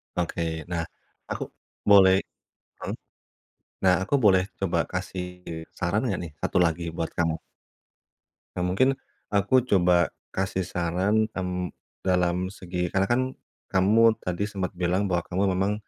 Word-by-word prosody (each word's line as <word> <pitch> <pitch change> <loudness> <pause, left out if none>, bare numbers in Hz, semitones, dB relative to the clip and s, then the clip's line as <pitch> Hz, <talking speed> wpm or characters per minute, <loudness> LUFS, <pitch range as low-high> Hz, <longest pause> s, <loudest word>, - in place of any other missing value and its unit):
Oke. 85 -2 -2
Nah, 85 -1 0 0.5
aku - - -2 0.5
boleh 95 -2 +8 0.7
heeh. - - -3 0.9
Nah, 90 -1 +6
aku 100 +9 +1
boleh 95 -3 +6 0.2
coba 95 -3 0
kasih 90 -1 -3 0.5
saran 90 +5 +1
enggak 100 - -1
nih? 80 - -7
Satu - - 0
lagi 85 +1 -1
buat 80 - -2
kamu. 85 -1 +2 1.2
Nah 90 - 0
mungkin 95 +9 +3 0.4
aku 115 +5 +3
coba 90 -3 +4 0.2
kasih 95 -1 -1
saran, 95 +5 +1
hmm, 90 -1 -3 0.3
dalam 90 0 +1
segi 90 -3 -3
karena 95 +2 +2
kan 120 +4 +2 0.5
kamu 110 +4 +4
tadi 90 +2 -2
sempat 95 -2 -3
bilang 90 +3 0
bahwa 90 -3 +1
kamu 95 +3 0
memang 95 +3 +1
95 Hz, 130 wpm, -26 LUFS, 90-100 Hz, 1.2 s, boleh